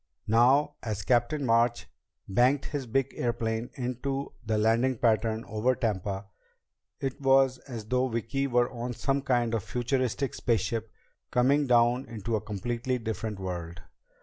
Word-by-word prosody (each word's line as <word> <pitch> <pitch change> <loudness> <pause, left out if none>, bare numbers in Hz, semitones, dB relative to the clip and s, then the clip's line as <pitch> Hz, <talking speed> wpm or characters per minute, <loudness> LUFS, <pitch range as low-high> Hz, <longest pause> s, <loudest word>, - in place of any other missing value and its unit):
Now, 135 +6 +4
as 105 -3 -3
Captain 130 +6 +1
March 115 0 +2 0.4
banked 125 +8 +3
his 140 -4 -4
big 135 +3 0
airplane 115 -1 -1
into 135 +2 -3
the 110 -1 0
landing 115 +4 +2
pattern 110 -1 +1
over 115 +4 +1
Tampa, 100 -3 -2 0.7
it 135 0 -4
was 135 -1 +4
as 115 -5 -6
though 125 +3 +1
Vicki 125 +4 -1
were 120 -1 +2
on 120 0 -4
some 135 +3 0
kind 120 -3 +1
of 110 -4 0
futuristic 130 +2 -1
spaceship 115 -1 -1 0.4
coming 140 +4 +3
down 120 +1 +3
into 115 0 -3
a 105 - -1
completely 120 +5 -2
different 110 -2 -4
world. 85 -3 -5
120 Hz, 140 wpm, -28 LUFS, 110-130 Hz, 0.7 s, Now